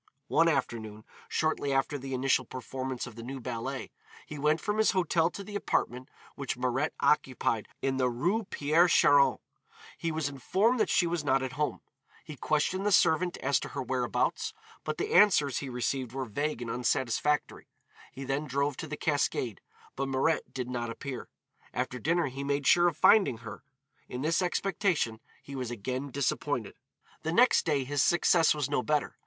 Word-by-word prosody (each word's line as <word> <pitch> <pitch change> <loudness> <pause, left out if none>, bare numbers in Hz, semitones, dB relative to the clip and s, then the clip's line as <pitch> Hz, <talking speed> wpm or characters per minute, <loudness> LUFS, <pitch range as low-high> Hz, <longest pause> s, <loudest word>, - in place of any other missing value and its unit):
One 165 - +4
afternoon, 110 -8 -2 0.2
shortly 155 -3 0
after 135 +2 +1
the 135 0 -4
initial 130 0 +2
performance 130 +1 -5
of 125 - -10
the 115 - -8
new 130 +3 -6
ballet, 125 +2 -5 0.3
he 150 - -8
went 150 +2 +2
from 210 0 -2
his 220 - +4
hotel 170 -3 +2
to 200 - -8
the 205 +1 -9
apartment 125 -9 -1 0.2
which 140 -3 -4
Mirette 130 +4 -1
occupied 125 -6 +1 0.2
in 135 -1 0
the 130 -1 +2
Rue 180 - 0
Pierre 160 +2 +3
Charon. 145 -4 +5 0.6
He 165 - -1
was 155 -2 -1
informed 190 - +1
that - - +2
she 180 - +3
was 170 -2 -1
not 135 -2 +2
at 130 - -3
home. 150 +3 -2 0.4
He 155 - -8
questioned 155 +7 0
the 205 - +1
servant 175 0 +3
as - - +2
to - - -6
her - - -4
whereabouts, 445 -1 -1 0.3
but - - -3
the 425 +3 -2
answers 150 -10 +5
he 140 - -6
received 125 0 -2
were 135 0 -3
vague 135 +3 -2
and 115 - -4
unsatisfactory. 125 +4 0 0.4
He 135 - -8
then 140 +3 -2
drove 140 +1 -1
to 160 - -5
the 150 0 -5
Cascade, 140 -7 -1 0.3
but 135 0 -2
Mirette 135 +4 0
did 125 -2 -4
not 120 -2 -3
appear. 130 +2 -6 0.5
After 125 0 -2
dinner 170 +4 +1
he 135 0 -5
made 140 0 -1
sure 175 +4 +5
of 165 -3 -1
finding 195 - +5
her. - - -8 0.5
In 125 +2 -4
this 165 +4 +2
expectation 180 - 0 0.2
he 140 - -9
was 130 -3 -3
again 130 +4 -4
disappointed. 140 +1 -2 0.5
The 160 - -2
next 240 0 +4
day 145 -4 +2
his 140 +1 0
success 170 0 +4
was 145 -3 -1
no - - 0
better. 150 +2 -1
140 Hz, 180 wpm, -29 LUFS, 130-165 Hz, 0.6 s, Charon